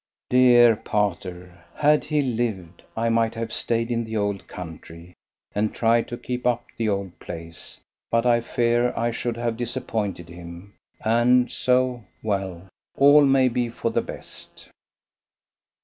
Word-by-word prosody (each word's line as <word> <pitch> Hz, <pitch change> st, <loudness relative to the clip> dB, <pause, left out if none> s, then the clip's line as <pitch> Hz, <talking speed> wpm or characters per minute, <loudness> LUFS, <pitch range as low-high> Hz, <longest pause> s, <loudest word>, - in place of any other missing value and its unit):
Dear 120 Hz, -2 st, +6 dB
pater, 90 Hz, -4 st, -3 dB
had 150 Hz, 0 st, +3 dB
he 150 Hz, -1 st, +1 dB
lived 110 Hz, -9 st, -3 dB, 0.2 s
I 115 Hz, +1 st, +1 dB
might 115 Hz, 0 st, +1 dB
have 115 Hz, 0 st, -4 dB
stayed 115 Hz, 0 st, 0 dB
in 115 Hz, 0 st, 0 dB
the 110 Hz, -1 st, -4 dB
old 100 Hz, -1 st, -2 dB
country, 85 Hz, 0 st, -10 dB, 0.4 s
and 105 Hz, +1 st, 0 dB
tried 115 Hz, 0 st, +2 dB
to 120 Hz, -, -6 dB
keep 125 Hz, 0 st, -3 dB
up 120 Hz, -1 st, 0 dB
the 115 Hz, -2 st, -1 dB
old 100 Hz, -3 st, -3 dB
place; 80 Hz, 0 st, -7 dB, 0.3 s
but 115 Hz, +1 st, +1 dB
I 120 Hz, -1 st, +4 dB
fear 120 Hz, +1 st, +1 dB
I 120 Hz, +1 st, +1 dB
should 120 Hz, 0 st, -3 dB
have 120 Hz, -1 st, -2 dB
disappointed 105 Hz, -6 st, -3 dB
him, 85 Hz, +3 st, -11 dB, 0.3 s
and 120 Hz, +2 st, +3 dB
so 125 Hz, -1 st, +1 dB, 0.2 s
well, 95 Hz, -4 st, -3 dB, 0.3 s
all 145 Hz, +2 st, +7 dB
may 135 Hz, -2 st, +4 dB
be 120 Hz, -1 st, 0 dB
for 115 Hz, 0 st, -3 dB
the -, -, +1 dB
best. -, -, -9 dB
115 Hz, 145 wpm, -24 LUFS, 100-120 Hz, 0.4 s, all